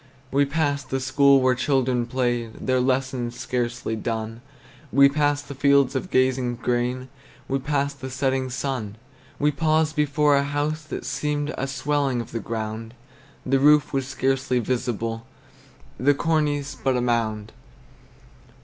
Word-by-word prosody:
We 140 Hz, +1 st, +3 dB
passed 140 Hz, -2 st, -1 dB
the 135 Hz, -, -1 dB
school 140 Hz, +1 st, +4 dB
where 130 Hz, 0 st, +4 dB
children 130 Hz, -2 st, +1 dB
played, 120 Hz, -2 st, -1 dB
Their 130 Hz, 0 st, +2 dB
lessons 130 Hz, -2 st, -1 dB
scarcely 120 Hz, -2 st, -2 dB
done; 110 Hz, +1 st, -4 dB, 0.5 s
We 140 Hz, 0 st, +7 dB
passed 145 Hz, 0 st, 0 dB
the 140 Hz, -, -6 dB
fields 140 Hz, -1 st, +3 dB
of 185 Hz, -, -2 dB
gazing 130 Hz, -3 st, +1 dB
grain, 125 Hz, +1 st, -1 dB, 0.4 s
We 135 Hz, 0 st, 0 dB
passed 140 Hz, 0 st, -2 dB
the 130 Hz, -, -5 dB
setting 130 Hz, 0 st, -1 dB
sun. 125 Hz, -5 st, -3 dB, 0.4 s
We 150 Hz, +1 st, +2 dB
paused 155 Hz, +1 st, +1 dB
before 150 Hz, -1 st, +3 dB
a 140 Hz, -, +2 dB
house 145 Hz, +2 st, -2 dB
that 155 Hz, -, -6 dB
seemed 150 Hz, 0 st, -2 dB
A 135 Hz, -, -2 dB
swelling 135 Hz, -1 st, 0 dB
of 115 Hz, -, -6 dB
the 115 Hz, -, -3 dB
ground; 110 Hz, +1 st, -5 dB, 0.5 s
The 135 Hz, +1 st, +2 dB
roof 150 Hz, +1 st, +4 dB
was 135 Hz, -1 st, -1 dB
scarcely 130 Hz, -1 st, 0 dB
visible, 115 Hz, -2 st, -2 dB, 0.7 s
The 145 Hz, +3 st, +3 dB
cornice 145 Hz, -2 st, 0 dB
but 130 Hz, -2 st, 0 dB
a -, -, 0 dB
mound. 110 Hz, -3 st, -1 dB
130 Hz, 145 wpm, -24 LUFS, 120-145 Hz, 0.7 s, We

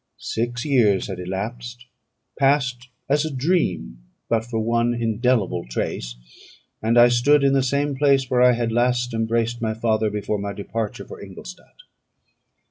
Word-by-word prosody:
Six 120 Hz, +3 st, -3 dB
years 110 Hz, -11 st, +2 dB
had 95 Hz, -2 st, -5 dB
elapsed, 115 Hz, +7 st, -6 dB, 0.5 s
passed 125 Hz, -3 st, +1 dB, 0.2 s
as 145 Hz, +2 st, +2 dB
a 160 Hz, -, -2 dB
dream 125 Hz, -, -1 dB, 0.3 s
but 115 Hz, -1 st, +1 dB
for 115 Hz, 0 st, -5 dB
one 115 Hz, +2 st, +1 dB
indelible 115 Hz, -2 st, 0 dB
trace, -, -, -3 dB, 0.7 s
and 115 Hz, +2 st, +1 dB
I 120 Hz, 0 st, +8 dB
stood 135 Hz, +4 st, +3 dB
in 135 Hz, 0 st, +3 dB
the 135 Hz, -, +3 dB
same 140 Hz, +2 st, 0 dB
place 135 Hz, -1 st, +3 dB
where 125 Hz, 0 st, +1 dB
I 125 Hz, 0 st, +6 dB
had 120 Hz, -1 st, -1 dB
last 125 Hz, +1 st, +1 dB
embraced 115 Hz, +1 st, -1 dB
my 110 Hz, -1 st, -1 dB
father 110 Hz, -1 st, +1 dB
before 105 Hz, 0 st, -3 dB
my 100 Hz, 0 st, -4 dB
departure 105 Hz, +1 st, -5 dB
for -, -, -11 dB
Ingolstadt. -, -, -12 dB
120 Hz, 150 wpm, -22 LUFS, 110-125 Hz, 0.7 s, I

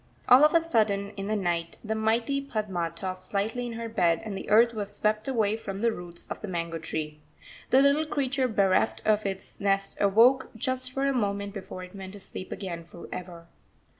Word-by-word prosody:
All 255 Hz, +4 st, +8 dB
of 305 Hz, +2 st, +5 dB
a 335 Hz, -, +6 dB
sudden, 210 Hz, -9 st, +1 dB
in 195 Hz, -1 st, -6 dB
the 215 Hz, -, 0 dB
night, 170 Hz, -4 st, -1 dB
the 220 Hz, 0 st, -2 dB
mighty 225 Hz, +5 st, +1 dB
Padma 210 Hz, -10 st, -2 dB
tossed 185 Hz, +1 st, -5 dB
slightly 220 Hz, +5 st, -1 dB
in 235 Hz, -, -5 dB
her 230 Hz, 0 st, -4 dB
bed, 175 Hz, -7 st, +2 dB
and 210 Hz, -3 st, -4 dB
the -, -, -6 dB
earth 230 Hz, +3 st, +6 dB
was 205 Hz, -2 st, -4 dB
swept 215 Hz, +2 st, 0 dB
away 220 Hz, -5 st, +1 dB
from 200 Hz, -3 st, -6 dB
the 235 Hz, 0 st, +3 dB
roots 175 Hz, -4 st, -8 dB
of -, -, -6 dB
the 215 Hz, -, -5 dB
mango 170 Hz, -2 st, -3 dB
tree. 155 Hz, -1 st, -4 dB, 0.5 s
The 265 Hz, +2 st, +6 dB
little 290 Hz, +2 st, +3 dB
creature 275 Hz, -3 st, 0 dB
bereft 200 Hz, -2 st, +2 dB
of 215 Hz, -1 st, +2 dB
its 190 Hz, -1 st, -6 dB
nest 195 Hz, 0 st, 0 dB
awoke 230 Hz, +7 st, +5 dB
just 255 Hz, +2 st, 0 dB
for 270 Hz, +1 st, -1 dB
a 275 Hz, -, +2 dB
moment 200 Hz, -4 st, -1 dB
before 190 Hz, -2 st, -7 dB
it 180 Hz, -, -11 dB
went 190 Hz, -1 st, -8 dB
to 205 Hz, -, -9 dB
sleep 185 Hz, 0 st, -8 dB
again 170 Hz, -4 st, -5 dB
for 170 Hz, +1 st, -12 dB
ever. 175 Hz, -2 st, -7 dB
205 Hz, 205 wpm, -27 LUFS, 185-235 Hz, 0.5 s, All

